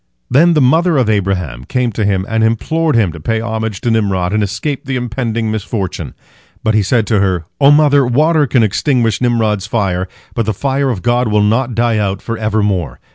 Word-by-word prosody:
Then 165 +5 +4
the 150 - +3
mother 160 +5 +3
of 120 -5 +2
Abraham 90 - -2
came 125 - -1
to 110 +1 -2
him 95 -2 0
and 110 0 0
implored 150 +8 0
him 105 -7 +2
to 80 - -10
pay 110 +8 -1
homage 110 -2 -4
to 120 - 0
Nimrod 100 -4 0
and 105 - +1
escape 135 +8 -3
the 135 - -3
impending 115 -2 -2
misfortune. 105 -3 -4 0.5
But 110 - +1
he 110 - +3
said 110 +3 +1
to 105 -1 +1
her: 95 -4 0
"O 140 -1 +6
mother, 145 -1 +5
water 150 +4 +2
can 125 -2 +2
extinguish 115 +1 0
Nimrod's 110 -5 0
fire, 95 -5 -1 0.3
but 115 -3 -2
the 110 - -1
fire 135 +3 -1
of 110 -8 -3
God 120 0 +1
will 105 -1 +2
not 115 +3 0
die 115 -1 +1
out 100 -1 -1
for 115 - -5
evermore. 105 - -1
110 Hz, 200 wpm, -15 LUFS, 100-125 Hz, 0.5 s, O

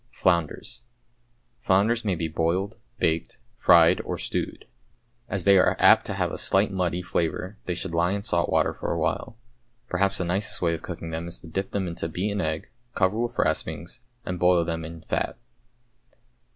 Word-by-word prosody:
=Flounders.= 85 +2 0 0.8
Flounders 105 +5 +2
may 100 -4 0
be 80 0 -2
boiled, 85 +6 -1 0.2
baked, 80 -4 0 0.2
fried, 85 +1 +5
or - - -4
stewed. - - -3 0.6
As 100 -3 -2
they 100 0 +6
are - - +4
apt - - +6
to - - -3
have - - 0
a - - -3
slight 100 +1 +3
muddy 90 -2 -1
flavour, 90 +3 -2
they 90 - -2
should 85 0 -4
lie 85 +2 +2
in 100 0 -3
salt 85 -5 +1
water - - +2
for - - -4
a - - -1
while. 115 - -2 0.5
Perhaps 95 +2 +1
the 90 - -1
nicest 95 +4 0
way 85 -2 +1
of 80 - -4
cooking 80 - -6
them 80 +1 -4
is 85 - -4
to 85 - -11
dip 95 +4 -3
them 100 -2 -2
into 85 -1 -3
beaten 100 +5 -1
egg, 80 -1 -3 0.3
cover 100 +3 +2
with 120 0 -2
raspings, 80 +4 -1 0.3
and 90 -1 -3
boil 90 -1 +4
them 80 0 -3
in 80 0 -8
fat. - - -2
90 Hz, 180 wpm, -26 LUFS, 85-95 Hz, 0.8 s, they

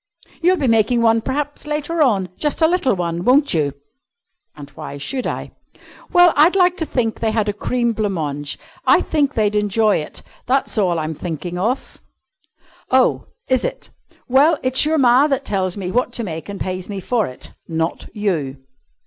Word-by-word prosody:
You'll 365 +2 +3
be 285 - -1
making 230 +1 +3
one, 225 0 +4
p'raps, 290 +4 -4
later 300 +2 -2
on 200 -10 +2
just 300 +2 -1
a - - +7
little 335 - +1
one, 170 -1 -3
won't 275 +6 +3
you?" 145 -4 0 0.8
"And 145 -2 -10
why 140 - -8
should 250 - -3
I?" - - -5 0.6
"Well, 355 -3 +6
I'd 315 +6 +5
like 360 -2 +4
to 320 - -2
think 225 -4 -1
they 225 - 0
had 215 -1 0
a 205 - 0
cream 235 +3 -1
blanc 210 -2 -1
mange. 145 -3 -4 0.3
I - - +6
think 290 -3 0
they'd 210 -1 +1
enjoy 210 +1 +2
it. 150 - -6 0.2
That's 265 +2 +1
all 180 -4 +2
I'm 155 0 -2
thinking 175 +2 -5
of." 235 +8 -2 0.9
"Oh, - - +2 0.2
is 260 -1 +1
it? - - -5 0.4
Well, 275 +6 +4
it's 260 +2 +2
your 315 +1 +1
ma 260 +1 +5
that 275 -2 -1
tells 190 -2 -1
me 185 -2 -4
what 250 +4 0
to 235 - -3
make 165 -2 -6
and 200 - -6
pays 185 0 -4
me 200 -1 -4
for 220 +2 0
it, 125 - -9 0.2
not 165 0 -2
you." 165 -11 -2
225 Hz, 185 wpm, -19 LUFS, 180-275 Hz, 0.9 s, a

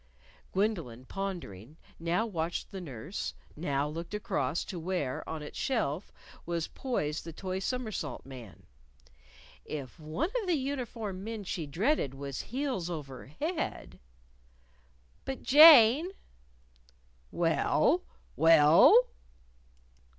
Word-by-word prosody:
Gwendolyn, 170 - -1
pondering, 160 - -6 0.2
now 170 +6 0
watched 170 -5 -3
the 190 - -6
nurse, 150 - -6 0.2
now 145 -3 -1
looked 165 +6 -6
across 205 -4 -1
to 180 - -6
where, 165 -6 -2
on 160 -2 -5
its 150 - -8
shelf, 205 - -1 0.3
was 170 -1 -2
poised 155 - -3
the 165 - -7
toy 185 +3 -4
somersault 235 +1 -4
man. 125 -7 -11 1.0
If 140 -3 -7
one 160 - -2
of 405 - -7
the 345 -3 +2
uniformed 235 -8 -4
men 220 -1 -5
she 170 -4 -4
dreaded 170 - 0
was 140 -1 -5
heels 255 -9 -3
over 140 -7 -7
head 315 - -4 1.2
"But, 270 - -5
Jane." 295 0 +8 1.2
"Well? 170 - +2 0.3
Well?" 165 - +7
175 Hz, 105 wpm, -30 LUFS, 150-230 Hz, 1.2 s, Jane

